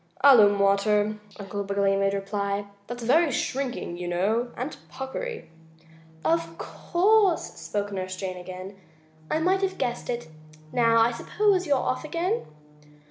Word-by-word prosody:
"Alum 215 -8 +7
water," 205 +2 +2 0.2
Uncle 200 0 -4
Wiggily 200 0 +1
made 195 0 +1
reply. 200 0 -2 0.2
"That's 240 0 -6
very 300 +6 +4
shrinking, 250 -10 -2
you 180 - -4
know, 210 +8 0
and 255 +5 -4 0.2
puckery." 455 - -5 0.8
"Of 165 +1 0
course," 390 +1 +2
spoke 205 0 -3
Nurse 185 -1 -4
Jane 185 -1 -4
again, 185 +2 -8 0.5
"I - - +1
might 370 +4 +2
have 385 -1 -1
guessed 240 - -2
it. 240 -6 -3 0.4
Now 230 -1 +3
I 230 +1 +4
suppose 380 - +1
you're 285 -2 +3
off 255 - -1
again?" 345 +8 -2
215 Hz, 135 wpm, -26 LUFS, 195-285 Hz, 0.8 s, Alum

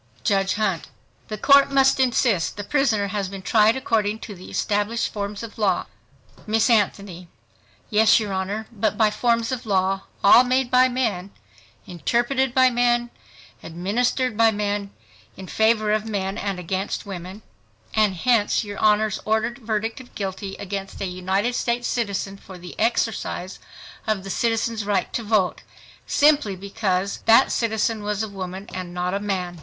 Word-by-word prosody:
JUDGE 195 - +1
HUNT—The 210 +1 -5
Court 280 +5 +5
must 270 -1 +4
insist 240 -9 +1
the 205 - -4
prisoner 225 -6 +1
has 200 -1 -2
been 195 -1 -8
tried 215 +1 +4
according 220 -5 0
to 210 - -7
the 185 -1 -12
established 210 +3 -1
forms 205 +1 -4
of 225 -1 -9
law. 210 -2 +1 0.6
Miss 220 +3 +2
ANTHONY—Yes, 205 +2 0
your 210 -3 -3
Honor, 195 +3 -3
but 215 -1 -1
by 215 -1 +3
forms 230 +1 0
of 250 -3 -4
law, 190 -1 0 0.2
all 230 +5 +8
made 255 0 0
by 255 0 +5
men, 220 -7 -2 0.6
interpreted 240 - 0
by 260 -1 +5
men, 240 0 +1 0.5
administered 230 +8 -1
by 225 +1 +5
men, 205 -1 -2 0.5
in 190 - -8
favor 220 +1 +2
of 215 +1 0
men 195 -2 -2
and 200 -3 -3
against 185 +3 -3
women; 190 +1 -8 0.5
and 210 -3 +2
hence 230 +3 +2
your 205 -1 -7
Honor's 215 -1 +2
ordered 220 +3 -1
verdict 225 0 -3
of 255 - -18
guilty, 195 0 -5
against 195 0 -6
a 195 - -2
United 190 +5 -1
States 240 0 -1
citizen 200 -4 -2
for 190 -1 -12
the 175 0 -10
exercise 225 -4 -1 0.5
of 215 -3 0
the 195 - -6
"citizen's 225 -1 0
right 200 -2 -1
to - - -1
vote," 210 -4 0 0.5
simply 290 -9 +3
because 195 0 -2
that 230 +4 +6
citizen 220 -1 0
was 210 +1 -2
a - - -3
woman 190 -1 -7
and 180 -1 -6
not 180 +1 -2
a 200 - 0
man 185 -4 -3
210 Hz, 155 wpm, -23 LUFS, 195-230 Hz, 0.6 s, all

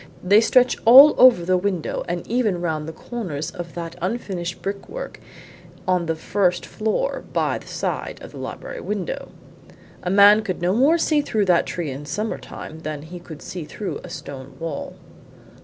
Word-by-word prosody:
They 200 +4 +6
stretch 250 +2 +4
all 270 +6 +10
over 245 -9 +7
the 185 +1 +3
window 185 -4 -2
and 175 0 -3
even 220 -6 0
round 160 -3 -2
the - - -4
corners 160 -6 -5
of 175 -2 -8
that 170 -1 -5
unfinished 185 -3 -3
brickwork 200 - -6 0.7
on 180 -2 +1
the 165 - 0
first 180 +2 0
floor 220 - -2
by - - 0
the - - -16
side - - -3
of - - -10
the - - -10
library - - -6
window. 200 -5 -4 0.7
A - - -3
man 205 +2 +7
could 195 -4 -4
no 175 +2 +1
more 275 +9 +4
see 310 -2 +2
through 220 -7 0
that 180 -2 +3
tree 170 -5 -3
in 140 +2 -7
summer 215 +6 -3
time 160 - -9
than 155 -2 -5
he 175 +3 -9
could 160 -3 -11
see 180 -3 -6
through 190 +6 -5
a 180 - -9
stone 140 -5 -9
wall." 165 -3 -5
180 Hz, 175 wpm, -22 LUFS, 165-220 Hz, 0.7 s, all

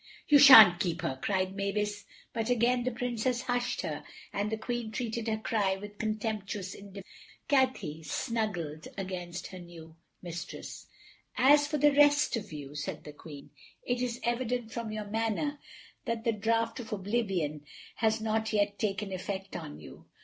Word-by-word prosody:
"You 290 -1 +7
shan't 220 -11 +10
keep 175 -1 -1
her," 130 0 -2
cried 190 -1 0
Mavis, 205 +1 -2 0.3
but 225 0 -2
again 245 +1 +2
the 255 - +1
Princess 245 +1 -1
hushed 245 -1 -1
her, - - -4 0.3
and 205 +2 -1
the 220 - -1
Queen 240 0 -3
treated 230 -1 -3
her 220 -1 0
cry 210 -3 0
with 205 +1 -10
contemptuous 210 -3 -3
indifference. 200 -1 -10 0.4
Cathay 255 - +1
snuggled 175 -5 -3
against 180 -2 -5
her 185 - -9
new 165 -2 -12 0.3
mistress. 175 -1 -7 0.5
"As 290 +2 +6
for 300 0 -1
the 295 0 +4
rest 290 0 +5
of 210 -4 -5
you," 145 -2 -7
said 145 0 -5
the 150 - -9
Queen, 145 -1 -11 0.3
"it 245 0 -1
is 245 -1 -2
evident 240 -1 -1
from 230 -2 -4
your 215 -1 -4
manner 225 +7 -1 0.5
that 230 -1 -2
the 230 - +2
draught 225 +3 0
of 230 - -8
oblivion 190 -8 -1 0.3
has 220 0 +2
not 220 0 -1
yet 205 -1 +1
taken 200 -1 -2
effect 190 +1 -5
on 75 - -6
you. 75 - -13
215 Hz, 160 wpm, -30 LUFS, 190-240 Hz, 0.5 s, shan't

